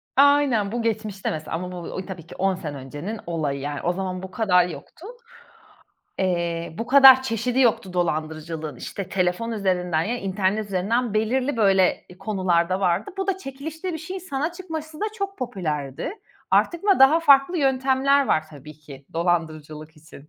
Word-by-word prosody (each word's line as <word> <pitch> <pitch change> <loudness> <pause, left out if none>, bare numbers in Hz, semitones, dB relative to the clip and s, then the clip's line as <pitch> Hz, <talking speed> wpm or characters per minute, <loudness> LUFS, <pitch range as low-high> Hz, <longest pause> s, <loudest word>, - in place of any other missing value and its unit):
Aynen, 275 -7 +4
bu 240 0 -2
geçmişte, 215 -3 -2
mesela 155 0 -4
ama 180 +2 -5
bu 180 - -7 0.2
u 185 - -5
tabii 175 -4 -9
ki - - -11
10 195 0 +1
sene 150 -6 -6
öncenin 145 +11 -6
olayı, 150 -5 -2
yani. 145 +1 -4
O 175 - 0
zaman 185 0 -4
bu 190 - -8
kadar 180 -6 +3
yoktu. 310 - -11 1.1
Eee, 170 -3 -1
bu 230 - -3
kadar 265 0 +8
çeşidi 250 +1 -1
yoktu 215 -6 +2
dolandırıcılığın. 155 -3 -3
İşte, 195 +7 -6
telefon 185 +4 -1
üzerinden 180 -6 0
ya 240 +7 -2
internet 195 +1 -1
üzerinden 205 +5 -1
belirli 250 +5 0
böyle 195 -4 +3
konularda 185 -3 0
vardı. 185 +2 0
Bu 385 0 -2
da 385 -1 0
çekilişte 320 +4 -6
bir 320 - -4
şeyin 370 +4 -6
sana 310 -1 -3
çıkması 320 -4 -7
da - - 0
çok 395 -2 -4
popülerdi. 155 - -3 0.4
Artık 345 +3 +2
ama 395 -2 +4
daha 285 +5 +6
farklı 285 +3 +5
yöntemler 270 0 +2
var 155 - +2
tabii 150 0 -11
ki 140 -2 -14
dolandırıcılık 155 -2 -2
için. 150 -1 -15
195 Hz, 165 wpm, -23 LUFS, 170-265 Hz, 1.1 s, kadar